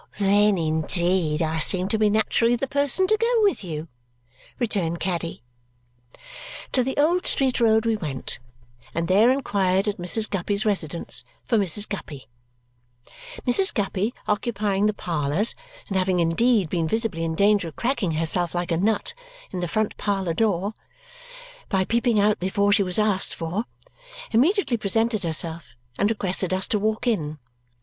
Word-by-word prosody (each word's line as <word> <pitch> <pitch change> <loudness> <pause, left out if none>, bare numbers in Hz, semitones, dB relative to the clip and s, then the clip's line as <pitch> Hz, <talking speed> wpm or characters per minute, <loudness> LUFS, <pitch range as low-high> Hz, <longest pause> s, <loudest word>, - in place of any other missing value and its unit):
"Then, 205 0 +3
indeed, 165 0 +1
I 160 0 -1
seem 185 +3 +2
to 220 - 0
be 215 -1 +4
naturally 220 +3 +2
the 245 - -2
person 285 +6 +1
to 430 +3 +3
go 460 +1 +2
with 400 - +1
you," 160 -2 -5 0.7
returned 190 -8 -1
Caddy. 170 -7 -3 1.3
To 255 - +2
the 265 +2 -3
Old 335 +5 +2
Street 265 -2 +1
Road 220 -1 +3
we 225 -1 +2
went 145 -9 -4 0.6
and 170 0 -1
there 205 +6 +5
inquired 200 -7 +1
at 205 - -1
Mrs. 215 +5 +2
Guppy's 200 +2 -1
residence 170 -9 -1 0.2
for - - +1
Mrs. 200 +2 +2
Guppy. 150 -9 -7 1.2
Mrs. 375 +10 +4
Guppy, 205 +1 -1 0.2
occupying 210 -1 0
the 215 - +1
parlours 165 +5 -1 0.3
and 195 - -4
having 185 -1 +1
indeed 195 +4 +2
been 165 0 -1
visibly 220 -4 -1
in 165 -1 -2
danger 200 -1 +3
of 160 - -10
cracking 240 -9 -1
herself 165 +2 -1
like 175 0 -2
a 165 - +2
nut 220 - 0 0.4
in 185 - -4
the 175 - -2
front 215 +4 -1
parlour 195 -4 -1
door 200 0 0 1.0
by 190 -2 +1
peeping 235 0 +1
out 210 +1 +2
before 200 +2 +1
she 205 - +3
was 180 -2 -1
asked 210 -3 +1
for, 175 +7 -3 0.7
immediately 270 - +2
presented 220 +1 0
herself 165 -4 -2 0.2
and 205 - +3
requested 190 -3 -1
us 190 - 0
to 210 - 0
walk 215 +3 -1
in. 155 -11 -1
200 Hz, 155 wpm, -24 LUFS, 175-225 Hz, 1.3 s, there